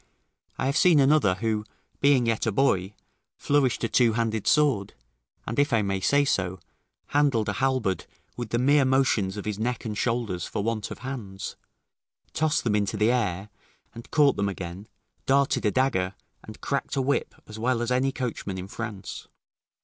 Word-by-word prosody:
I - - -1
have 140 +2 +1
seen 175 -5 +5
another 135 -9 +4
who, 110 +1 -1 0.4
being 140 -3 +4
yet 115 0 0
a - - +2
boy, 100 -4 +1 0.4
flourished 140 -5 +1
a - - +2
two 115 -1 +3
handed 110 -2 -1
sword, 140 -10 +2 0.5
and, 115 +4 -3
if 145 0 +2
I 115 -3 +3
may 95 -1 -1
so 140 +9 +3
say, 95 -9 0 0.5
handled 140 -7 +2
a - - 0
halberd 130 -5 0 0.3
with 120 -3 -5
the 120 - 0
mere 140 +3 +4
motions 130 -7 +1
of 105 - -6
his 105 -1 -3
neck 120 +2 -2
and 105 -2 -3
shoulders 110 -7 -1
for 100 - -3
want 110 -1 -2
of - - -7
hands; 105 -8 -6 0.8
tossed 155 -1 +1
them 115 - +1
into 105 +1 0
the 105 +3 +3
air, 105 -5 -1 0.4
and 115 0 -11
caught 145 -2 +4
them 100 0 0
again, 95 +1 -7 0.4
darted 135 -4 +2
a - - +2
dagger, 100 -8 0 0.3
and - - -12
cracked - - -2
a 135 - +1
whip 140 +2 -1
as 110 0 -10
well 120 +1 +1
as 120 +1 -2
any 130 +2 +2
coachman 115 -7 -4
in 95 0 -6
France. 105 -2 -7
115 Hz, 180 wpm, -26 LUFS, 100-135 Hz, 0.8 s, seen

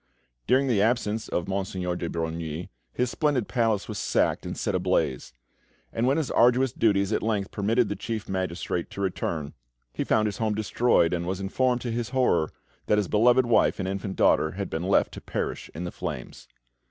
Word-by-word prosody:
During 135 +2 +4
the 115 -7 +2
absence 110 -1 0
of 85 - -2
Monseigneur 95 -2 -2
de 85 -1 -3
Brogni, 80 0 -4 0.2
his 125 -1 -1
splendid 145 -7 0
palace 115 -5 +1
was 105 -3 -5
sacked, - - +1
and - - -5
set - - -1
ablaze; 65 0 0 0.6
and 115 +2 +1
when 135 +3 +3
his 155 -5 -1
arduous 125 +2 +4
duties 100 -2 +2
at - - +1
length 105 -3 -1
permitted 110 +3 +1
the 105 - -3
Chief 110 -1 -4
Magistrate 90 -2 -2
to 100 - -6
return, 85 -5 -2 0.4
he - - -2
found 110 - +2
his 105 +1 -2
home 110 -2 0
destroyed, 110 -4 +2
and 85 0 -2
was 95 0 -2
informed, 125 +5 0
to 120 - -3
his 115 0 -2
horror, 125 -12 +2 0.4
that 105 - +3
his 105 -3 +1
beloved 120 +4 +4
wife 120 - +3
and 95 - -3
infant 95 0 -3
daughter 80 - +3
had 100 +1 -4
been 80 - -2
left 95 +2 +2
to - - -8
perish - - -4
in 85 - -4
the 90 - -4
flames. - - -6
105 Hz, 190 wpm, -26 LUFS, 90-120 Hz, 0.6 s, During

